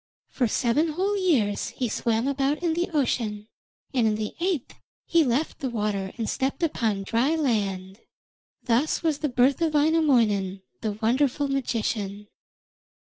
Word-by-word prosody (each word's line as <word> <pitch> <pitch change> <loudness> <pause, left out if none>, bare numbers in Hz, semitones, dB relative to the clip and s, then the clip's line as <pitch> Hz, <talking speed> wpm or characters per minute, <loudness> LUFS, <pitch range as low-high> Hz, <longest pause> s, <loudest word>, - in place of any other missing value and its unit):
For 250 - 0
seven 280 +9 +1
whole 390 +5 0
years 275 - +1
he 250 - -3
swam 230 +2 0
about 280 +3 0
in 335 -2 +2
the 345 +2 -1
ocean, 230 -8 -1 0.5
and 240 -4 +3
in 215 - +1
the 215 0 -4
eighth 345 -7 -1 0.3
he 335 -1 +4
left 275 +4 -1
the 270 -4 -2
water 210 -4 -2
and 225 -2 -2
stepped 270 +6 -2
upon 225 -10 0
the 195 - -6
dry 245 +10 +1
land. 200 -9 -1 0.6
Thus 250 +8 +1
was 310 -3 +1
the 300 - -1
birth 255 +5 +2
of 320 -2 +1
Wainamoinen, 235 - +2 0.2
the 215 -2 -1
wonderful 255 +6 +1
magician. 215 -6 -2
250 Hz, 150 wpm, -25 LUFS, 215-300 Hz, 0.6 s, he